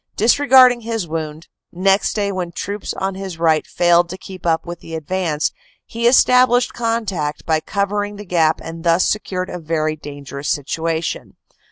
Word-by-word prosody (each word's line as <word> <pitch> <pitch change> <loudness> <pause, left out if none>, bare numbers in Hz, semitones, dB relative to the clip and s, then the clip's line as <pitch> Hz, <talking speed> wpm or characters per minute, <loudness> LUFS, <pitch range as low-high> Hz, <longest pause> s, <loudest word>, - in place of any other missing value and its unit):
Dis 225 +6 +3
regarding 255 -4 +6
his 225 -5 -3
wound, 155 0 -5 0.2
next 195 +3 +1
day 200 -2 0
when 180 -3 -4
troops 200 +4 -5
on 195 0 -2
his 190 -3 -7
right 160 -2 +2
failed 175 0 +3
to 185 - -6
keep 185 -2 -8
up 165 -1 +1
with 175 0 -7
the 165 - -8
advance, 160 -1 -1 0.3
he 235 +1 -1
established 250 0 +4
contact 205 -11 -2
by 160 -1 +2
cover 200 +4 -1
ing 205 0 -6
the 205 +1 -9
gap 165 -4 +2
and 165 0 -8
thus 170 +1 +3
secured 185 -3 -2
a 180 - -5
very 155 -1 -1
dangerous 145 -1 -7
situation. 160 +3 -2
180 Hz, 170 wpm, -19 LUFS, 160-205 Hz, 0.3 s, regarding